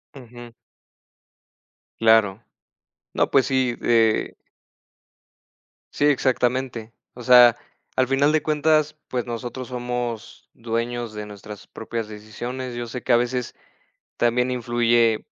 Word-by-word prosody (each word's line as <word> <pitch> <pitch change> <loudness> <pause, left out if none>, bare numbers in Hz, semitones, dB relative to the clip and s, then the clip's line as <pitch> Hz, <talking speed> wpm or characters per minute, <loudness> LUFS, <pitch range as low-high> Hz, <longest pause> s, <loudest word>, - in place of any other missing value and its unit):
Ujú. 120 -2 -12 1.5
Claro. 110 -2 +3 0.7
No, - - 0
pues, 135 -2 +3
sí, 130 -3 0
eh 115 -2 +2 1.6
Sí, 145 - +1
exactamente. 125 -4 0 0.2
O 125 - -10
sea, 120 -1 +7 0.4
al 130 0 +2
final 140 +3 +2
de 155 -1 +1
cuentas, 155 0 +1
pues, 125 -2 -3
nosotros 120 +1 -6
somos 125 -2 -5
dueños 115 0 -4
de 105 0 -6
nuestras 105 0 -11
propias 115 0 -6
decisiones. 120 +4 -7
Yo 120 0 -5
sé 125 +2 -6
que - - +1
a - - +6
veces 125 0 -2 0.6
también 125 +1 +1
influye, 120 -2 +1
120 Hz, 115 wpm, -23 LUFS, 115-130 Hz, 1.6 s, sea